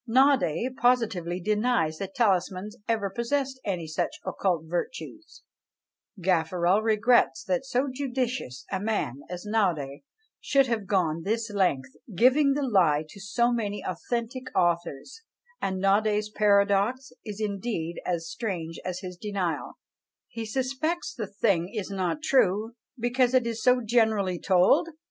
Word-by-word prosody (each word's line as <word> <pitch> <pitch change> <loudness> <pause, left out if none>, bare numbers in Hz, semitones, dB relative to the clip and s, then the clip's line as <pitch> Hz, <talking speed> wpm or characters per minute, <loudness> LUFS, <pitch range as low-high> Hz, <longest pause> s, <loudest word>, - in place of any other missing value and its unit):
Naudé 255 - +3
positively 225 -9 +1
denies 210 -5 +1
that 195 +8 -6
talismans 195 -3 0
ever 220 -3 +1
possessed 260 +5 -2
any 180 -5 -2
such 160 +2 -1 0.2
occult 175 -5 0
virtues: 260 - -5 0.8
Gaffarel 180 +2 +2
regrets 220 -4 +3
that 270 -1 -1
so 265 +1 0
judicious 255 - -3
a 190 - -1
man 195 - -2
as 180 +2 -6
Naudé 175 -11 0 0.4
should 275 -1 +3
have 225 -5 -2
gone 170 -5 +1
this 225 +4 -2
length, 145 -10 0 0.2
giving 275 - +5
the 290 +1 -1
lie 165 -9 +3
to 200 - -12
so 235 +5 +1
many 205 -4 -2
authentic 235 +8 -3
authors; 175 - -1 0.4
and 190 -1 -1
Naudé's 210 +2 +2
paradox 205 +5 +2
is 210 -2 -7
indeed 200 -5 -3
as 170 -2 -2
strange 170 -6 -4
as 185 0 -4
his 180 -2 -7
denial; 185 -5 -3 0.5
he 225 -1 -6
suspects 270 +8 -2
the 220 -5 -5
thing 195 -4 +1
is 210 -3 -4
not 190 - -2
true 220 -5 +2 0.3
because 245 +1 +2
it 255 -2 +4
is 230 -1 -3
so 250 +1 +4
generally 220 -6 +1
told! 190 - +4
210 Hz, 135 wpm, -27 LUFS, 180-245 Hz, 0.8 s, giving